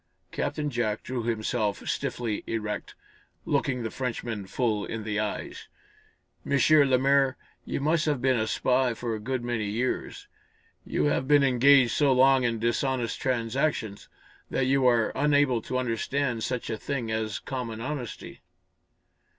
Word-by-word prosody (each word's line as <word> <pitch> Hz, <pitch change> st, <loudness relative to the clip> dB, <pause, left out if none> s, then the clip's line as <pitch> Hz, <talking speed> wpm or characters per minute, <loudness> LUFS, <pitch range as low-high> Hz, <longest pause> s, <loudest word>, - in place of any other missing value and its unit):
Captain 150 Hz, 0 st, -2 dB
Jack 110 Hz, -4 st, -1 dB
drew 130 Hz, -1 st, -3 dB
himself 110 Hz, -2 st, -2 dB
stiffly 115 Hz, -4 st, -2 dB
erect, 105 Hz, -2 st, -4 dB, 0.5 s
looking 125 Hz, -2 st, 0 dB
the 110 Hz, -, -3 dB
Frenchman 115 Hz, -5 st, -4 dB
full 110 Hz, -2 st, 0 dB
in 110 Hz, +1 st, -5 dB
the 105 Hz, -1 st, -2 dB
eyes. 105 Hz, 0 st, -4 dB, 0.8 s
"M. -, -, -3 dB, 0.4 s
Lemaire, 135 Hz, +1 st, +3 dB, 0.3 s
you -, -, -3 dB
must 155 Hz, +3 st, +1 dB
have 145 Hz, -4 st, +1 dB
been 130 Hz, -1 st, +2 dB
a 110 Hz, -, 0 dB
spy 125 Hz, 0 st, +1 dB
for 115 Hz, 0 st, -3 dB
a 110 Hz, -, -3 dB
good 125 Hz, +3 st, -3 dB
many 120 Hz, -3 st, -2 dB
years. 120 Hz, +5 st, -3 dB, 0.6 s
You -, -, 0 dB
have 145 Hz, -3 st, +1 dB
been 145 Hz, -1 st, +5 dB
engaged 135 Hz, -1 st, +5 dB
so 140 Hz, -3 st, +3 dB
long 130 Hz, 0 st, +5 dB
in 115 Hz, -1 st, 0 dB
dishonest 120 Hz, +1 st, -1 dB
transactions 120 Hz, -3 st, -1 dB, 0.4 s
that 130 Hz, -, 0 dB
you 135 Hz, 0 st, +3 dB
are 115 Hz, -3 st, +3 dB
unable 145 Hz, -4 st, +2 dB
to 130 Hz, -, -3 dB
understand 125 Hz, 0 st, -1 dB
such 125 Hz, -2 st, -3 dB
a 110 Hz, -, -2 dB
thing 125 Hz, -6 st, -3 dB
as 110 Hz, -1 st, -2 dB
common 120 Hz, -4 st, -5 dB
honesty." 130 Hz, -1 st, -6 dB
125 Hz, 145 wpm, -27 LUFS, 115-135 Hz, 0.8 s, been